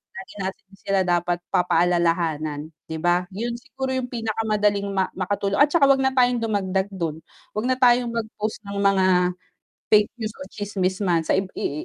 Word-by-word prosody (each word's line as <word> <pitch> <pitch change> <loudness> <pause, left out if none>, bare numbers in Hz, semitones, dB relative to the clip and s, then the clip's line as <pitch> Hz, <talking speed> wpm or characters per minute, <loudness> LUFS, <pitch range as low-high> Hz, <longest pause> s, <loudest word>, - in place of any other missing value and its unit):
lagi 380 0 -9
natin 190 +1 -5
sila 195 0 0
dapat 175 0 +1
pa-pa-alalahanan, 165 -4 +1 0.2
'di 160 - -3
ba? 175 +2 +2
'Yun 230 +5 -3
siguro 260 +2 -5
'yung 255 -1 -2
pinakamadaling 215 -3 0
ma 190 -1 +1
makatulong 200 +1 -1
at 290 - +7
tsaka 330 -5 +5
h'wag 270 -1 +4
na 265 - +3
tayong 250 -2 +3
dumagdag 195 -3 0
dun, 165 -5 -3 0.4
h'wag 215 +4 -1
na 255 - +3
tayong 245 -1 +4
mag-post 220 -2 -4
ng 200 - -5
mga 195 -1 +3 0.9
fake 210 -1 +5
news 215 -1 -3
o 280 - -8
tsismis 190 -2 -2
man 175 -3 +2
saib 190 +3 +1
i 150 +2 -3
200 Hz, 165 wpm, -23 LUFS, 180-230 Hz, 0.9 s, at